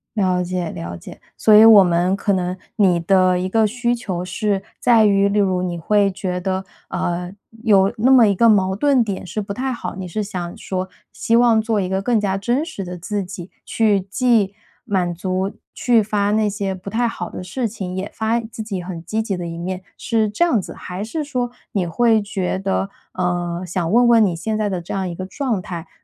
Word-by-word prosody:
了 185 -4 +1
解 180 -2 -3
了 85 +1 -6
解， 85 - -12 0.2
所 215 - +4
以 215 +1 +9
我 215 -3 +9
们 175 +1 +2
可 200 - 0
能 180 -1 -1 0.2
你 185 -5 +3
的 185 +1 +3
一 185 - -2
个 220 +3 +3
需 240 +2 0
求 190 -7 -4
是 195 +1 -1 0.2
在 230 -3 +4
于， 200 -1 +4
例 205 +1 +1
如 185 -2 +1
你 175 -1 -2
会 200 +4 +2
觉 180 -1 -3
得， 190 +1 -2 0.2
呃， 175 +1 -3 0.3
有 200 -3 +4
那 240 +5 +3
么 240 -5 +7
一 200 - +2
个 230 +5 +4
矛 190 -3 +3
盾 275 +2 +3
点 200 -4 -4
是 185 +5 -3
不 200 0 -5
太 260 +4 -2
好， 235 - -6
你 190 -1 -5
是 195 +5 -3
想 180 -4 -5
说 185 0 -4 0.2
希 230 - -1
望 235 -1 +5
做 220 -1 0
一 185 - -2
个 190 +1 -1
更 225 +2 +1
加 195 -1 -1
真 240 +9 0
实 320 - -6
的 180 0 -6
自 200 +3 -3
己， 180 -1 -9
去 215 -3 +2
既 210 0 +1 0.3
满 180 -3 0
足 185 +2 -2 0.2
去 240 -2 +3
发 205 -1 0
那 215 0 +2
些 200 -1 -2
不 185 +1 -10
太 235 +4 0
好 180 -6 -5
的 - - -7
事 235 +7 -3
情， 190 -4 -5
也 190 +1 -3
发 220 +1 0
自 225 -1 -7
己 205 -4 -4
很 175 -2 -7
积 215 +6 -2
极 215 -3 -2
的 175 - -5
一 165 0 -6
面， 185 +2 -4 0.2
是 225 -2 0
这 210 +11 +2
样 245 - +2
子？ - - -8
还 180 +2 -7
是 295 +9 -3
说 250 -4 -2 0.2
你 195 -3 0
会 220 +6 +2
觉 195 -3 -2
得， 195 0 -1 0.3
呃， 175 -1 -2
想 175 -1 -2
问 240 +2 +5
问 230 -2 +6
你 180 -4 0
现 215 +6 -2
在 215 -1 0
的 185 -3 -2
这 170 - -6
样 190 -1 -2
一 - - -5
个 185 - -5
状 240 -1 -2
态 175 -2 -7
195 Hz, 235 characters per minute, -20 LUFS, 180-220 Hz, 0.3 s, 以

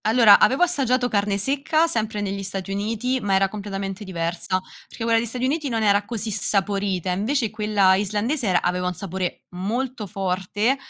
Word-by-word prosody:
Allora, 220 -2 +7
avevo 265 +9 +4
assaggiato 260 -7 +1
carne 200 -2 0
secca, 285 +8 +1
sempre 220 -8 -1
negli 200 -1 -3
Stati 195 0 -5
Uniti, 225 +6 -1
ma 200 -2 +1
era 195 0 +3
completamente 195 -1 -5
diversa. 175 0 -2 0.3
Perché 230 - -8
quella 230 0 +3
degli 235 - -2
Stati 250 +3 -3
Uniti 290 +1 -1
non 225 -2 -1
era 205 -1 +3
così 220 0 -4
saporita, 195 -3 -1
invece 220 +5 0
quella 210 -3 +3
islandese 210 +7 0
era 180 -2 +2
aveva 180 +1 0
un 180 - -2
sapore 185 0 -4
molto 220 +5 -3
forte, 195 +5 -1
205 Hz, 170 wpm, -23 LUFS, 195-235 Hz, 0.3 s, Allora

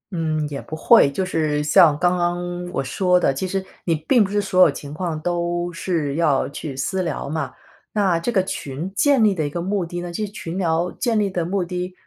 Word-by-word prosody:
嗯， 155 -3 -1
也 140 -2 -5
不 155 - -7
会。 160 0 +5
就 185 +7 -2
是 155 -4 0
像 150 0 +5
刚 180 +2 +2
刚 175 0 -2
我 - - -2
说 180 +7 +2
的， 175 -6 +2
其 165 +8 -3
实 190 +1 -2 0.2
你 165 - +2
并 210 - +3
不 195 - -3
是 205 +1 +1
所 185 -2 +2
有 180 - +8
情 140 +1 -8
况 160 -1 -3
都 175 +1 -1
是 165 -4 -2
要 150 -4 +2
去 140 0 -6
私 185 +8 -1
聊 170 -5 -3
嘛。 155 +1 -3 0.4
那 195 -5 +2
这 170 - -3
个 195 -5 +2
群 170 -2 -5
建 275 +3 +3
立 210 -2 +4
的 160 -5 -2
一 - - -2
个 170 +4 -4
目 190 0 -1
的 175 +1 -5
呢 175 0 -6
就 210 +5 -2
是 200 - -9
群 180 -4 -6
聊 170 -1 +1
建 230 -3 0
立 205 -1 +1
的 180 -2 -2
目 190 +2 -1
的 180 +1 -4
175 Hz, 250 characters per minute, -21 LUFS, 155-190 Hz, 0.4 s, 有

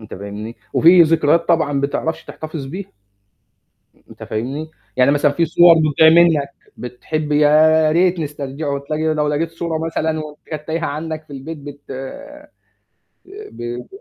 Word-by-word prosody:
أنت 110 - -10
فاهمني؟ 105 +4 -8 0.2
وفي 170 +2 +6
ذكريات 165 +1 +2
طبعًا 145 -4 +1
بتعرفش 160 +3 -2
تحتفظ 155 -3 -7
بيها، 190 +7 -8 1.2
أنت - - -14
فاهمني، 135 +9 -4 0.3
يعني 130 +1 +4
مثلًا 145 0 +2
في 170 +3 +1
صور 170 +1 +6
بتضيع 155 0 +4
منك 165 -4 +4 0.3
بتحب 150 +5 -4
يا 155 +1 +4
ريت 175 0 +2
نسترجعه، 140 -1 -4
تلاقي 155 +2 -2
لو 150 -1 0
لقيت 155 +3 -1
صورة 165 -1 -3
مثلًا 160 -1 -2
وأنت 150 -1 -9
كانت 150 -1 -7
تايهه 165 +1 -2
عندك 155 +2 -5
في 145 - -14
البيت 150 +4 -7
بت 145 0 -10 1.5
ب 375 - -8
ب - - -20
155 Hz, 145 wpm, -18 LUFS, 145-165 Hz, 1.5 s, وفي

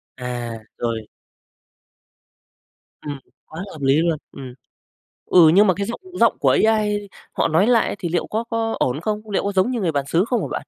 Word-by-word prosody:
À, 120 -2 -5 0.2
rồi. 115 -2 -3 1.9
Ừm, 145 -2 -5 0.3
quá 160 +3 -8
hợp - - -10
lý 135 +1 +3
luôn, 165 -2 +1
ừm. 130 -3 -9 0.7
Ừ, 165 -3 +6
nhưng 205 +2 +6
mà 185 - +4
cái 200 +3 -3
giọng 235 - -5 0.2
giọng 230 -1 +4
của - - +3 0.2
AI 210 -2 +1 0.3
họ - - +1
nói 165 +7 +3
lại 235 -2 +3
á, - - -4
thì 170 - -3
liệu 175 - -1
có 220 +2 -2
có 225 -1 -1
ổn 130 +5 0
không? 215 +2 -3
Liệu 195 - 0
có 200 - -1
giống 195 +6 +1
như 240 - -2
người 175 -5 0
bàn 140 -2 -1
xứ 175 +7 +2
không 245 - 0
hả - - -3
bạn? - - -5
185 Hz, 200 wpm, -21 LUFS, 140-215 Hz, 1.9 s, Ừ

